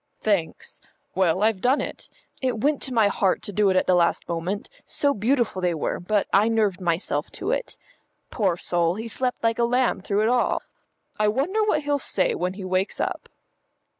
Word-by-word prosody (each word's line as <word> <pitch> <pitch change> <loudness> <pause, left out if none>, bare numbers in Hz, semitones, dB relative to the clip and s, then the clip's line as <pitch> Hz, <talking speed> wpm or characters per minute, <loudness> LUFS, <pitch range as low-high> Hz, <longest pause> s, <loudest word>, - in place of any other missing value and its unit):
"Thanks. 200 -7 -1 0.3
Well, 185 +1 +2
I've 215 -3 +2
done 255 +5 +3
it. - - -6 0.3
It 255 -4 -1
went 290 +1 +1
to 265 - -3
my 225 -4 +4
heart 195 -1 +1
to 205 - -5
do 205 0 +3
it 190 - +2
at 185 - +3
the 185 - +3
last 170 -1 +2
moment, 175 +4 -3 0.2
so 285 -1 0
beautiful 230 -3 0
they 175 -2 +1
were, 155 - -2
but 205 +3 0
I 205 +3 +5
nerved 210 -5 +1
myself 175 0 -1
to - - -2
it. - - -3 0.5
Poor 190 -7 +1
soul, 175 -1 +1
he 225 +3 -5
slept 250 +2 -2
like 230 0 +1
a - - +3
lamb 245 -3 +1
through 205 +2 0
it - - +2
all. 245 0 +1 0.6
I 210 - +3
wonder 300 - +1
what 310 -8 +1
he'll 290 0 0
say 195 -7 0
when 180 +1 -2
he 190 -1 -7
wakes 185 +1 -1
up." - - -3
210 Hz, 195 wpm, -24 LUFS, 185-245 Hz, 0.6 s, I